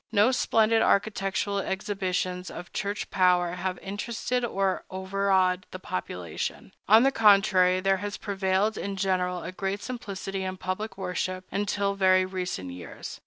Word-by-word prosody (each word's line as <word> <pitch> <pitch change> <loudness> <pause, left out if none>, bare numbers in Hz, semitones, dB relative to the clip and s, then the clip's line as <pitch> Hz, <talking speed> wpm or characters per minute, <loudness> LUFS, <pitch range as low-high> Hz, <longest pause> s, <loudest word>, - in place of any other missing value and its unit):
No 215 +3 +4
splendid 225 -3 +3
architectural 200 0 +1
exhibitions 185 -2 -2
of 175 - -9
Church 200 -1 -3
power 180 -2 +3
have 180 +1 -3
interested 230 +5 -2
or 195 -5 0
overawed 190 -1 +1
the - - -7
population. 90 - -5 0.2
On 220 +3 +8
the 270 - +4
contrary, 195 -5 +5
there 195 0 +2
has 205 +1 -4
prevailed 195 +1 0
in 200 0 -3
general 180 -2 0
a - - -5
great 195 +2 -3
simplicity 195 -5 -5
in 185 0 -4
public 185 +4 -4
worship, 185 0 -3
until 200 0 0
very 185 -1 +4
recent 180 - -4
years. 90 0 -8
190 Hz, 140 wpm, -27 LUFS, 185-205 Hz, 0.2 s, On